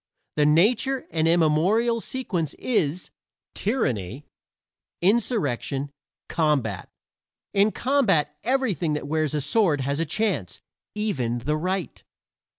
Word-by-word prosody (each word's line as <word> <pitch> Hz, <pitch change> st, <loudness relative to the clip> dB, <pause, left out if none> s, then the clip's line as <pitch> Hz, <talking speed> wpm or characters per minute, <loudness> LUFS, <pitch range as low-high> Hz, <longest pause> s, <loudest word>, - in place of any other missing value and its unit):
The 150 Hz, -1 st, +3 dB
natural 230 Hz, -, +3 dB
and 160 Hz, -1 st, +1 dB
immemorial 175 Hz, +9 st, +3 dB
sequence 185 Hz, -, -3 dB
is: 180 Hz, -, -1 dB, 0.4 s
tyranny, 130 Hz, -, -2 dB, 0.7 s
insurrection, 155 Hz, -, 0 dB, 0.4 s
combat. 140 Hz, -, 0 dB, 0.6 s
In 205 Hz, +2 st, +4 dB
combat 200 Hz, -, +1 dB
everything 230 Hz, -, 0 dB
that 150 Hz, -1 st, -3 dB
wears 155 Hz, -1 st, 0 dB
a 150 Hz, -, 0 dB
sword 150 Hz, -1 st, +2 dB
has 140 Hz, +3 st, -1 dB
a 165 Hz, -, +1 dB
chance 160 Hz, -, -1 dB, 0.4 s
even 135 Hz, -, -1 dB
the 145 Hz, +6 st, -1 dB
right. 185 Hz, +3 st, -3 dB
165 Hz, 105 wpm, -24 LUFS, 145-215 Hz, 0.7 s, In